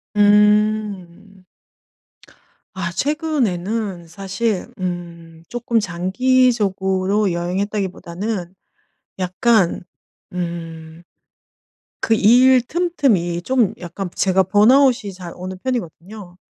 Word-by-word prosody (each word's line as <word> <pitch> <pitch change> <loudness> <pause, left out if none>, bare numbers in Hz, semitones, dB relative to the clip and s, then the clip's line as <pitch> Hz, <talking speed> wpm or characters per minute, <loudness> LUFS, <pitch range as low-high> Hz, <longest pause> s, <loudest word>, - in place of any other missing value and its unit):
음. 205 -2 +2 1.3
아. 170 -3 -4
최근에는 220 - -2
사실 195 +3 -3
음 170 -2 -6
쪼끔 240 -1 0
장기적으로 195 -1 +1
여행했다기보다는 185 +1 -3 0.7
약간 185 +1 +1 0.5
음. 165 -2 -6 1.0
그 - - -1
일 250 +4 +5
틈틈이 245 - 0
좀 245 -2 +1
약간 180 +2 -6
제가 190 0 +2
번아웃이 220 +3 +4
잘 180 -2 -9
오는 185 +1 -6
편이거든요. 200 -5 -5
195 Hz, 180 characters per minute, -20 LUFS, 175-225 Hz, 1.3 s, 일